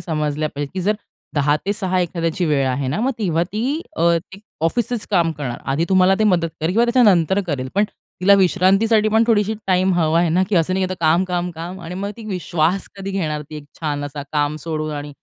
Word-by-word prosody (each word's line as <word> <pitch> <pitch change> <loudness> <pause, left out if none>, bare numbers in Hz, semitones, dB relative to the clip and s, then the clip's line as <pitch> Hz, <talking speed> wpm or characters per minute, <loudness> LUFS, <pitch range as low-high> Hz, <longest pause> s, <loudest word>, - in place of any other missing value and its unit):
समजल्या 155 -2 -2
पाहिजेत, 145 0 -4
की 190 - -2
जर 210 +4 +2 0.4
10 145 0 +2
ते 205 - +2
6 190 -3 -1
एखाद्याची 170 0 -1
वेळ 140 -3 +1
आहे 130 +1 -1
ना, 155 +10 -1
मग 260 +4 +1
तेव्हा 170 -6 +1
ती 255 +9 -1 0.2
अ, - - -1 0.3
एक 195 - -13 0.2
ऑफिसचंच 235 +5 -1
काम 170 -4 +2
करणार. 125 -5 -4
आधी 160 +4 +1
तुम्हाला 190 0 +4
ते 215 - +2
मदत 175 -5 +2
करेल 160 - 0
किंवा 230 +3 +3
त्याच्यानंतर 205 -7 +4
करेल. 135 -5 -3
पण 205 - +3 0.4
तिला 200 +2 +6
विश्रांतीसाठी 195 +4 +3
पण 220 +1 +3
थोडीशी 220 -2 +2
टाईम 185 0 +2
हवा 165 -1 +2
आहे 175 - +2
ना, 175 +4 +2
की 205 - +1
असं 170 +2 +2
नाही, 190 -1 +1
की 185 - -4
आता 170 -3 -5
काम, 170 +4 +4
काम, 180 -1 -2
काम 175 +3 -7
आणि 170 +1 -7
मग 200 +2 -3
ती 230 - -10
वी 190 -3 -2
श्वास 170 +3 0
कधी 195 0 -5
घेणार 155 -6 -2
ती 155 - -6
एक 150 - -9 0.2
छान 145 -3 -2
असा 145 0 -6
काम 150 0 0
सोडून 155 -1 -2
आणि 145 0 -5
180 Hz, 230 wpm, -20 LUFS, 155-195 Hz, 0.4 s, तिला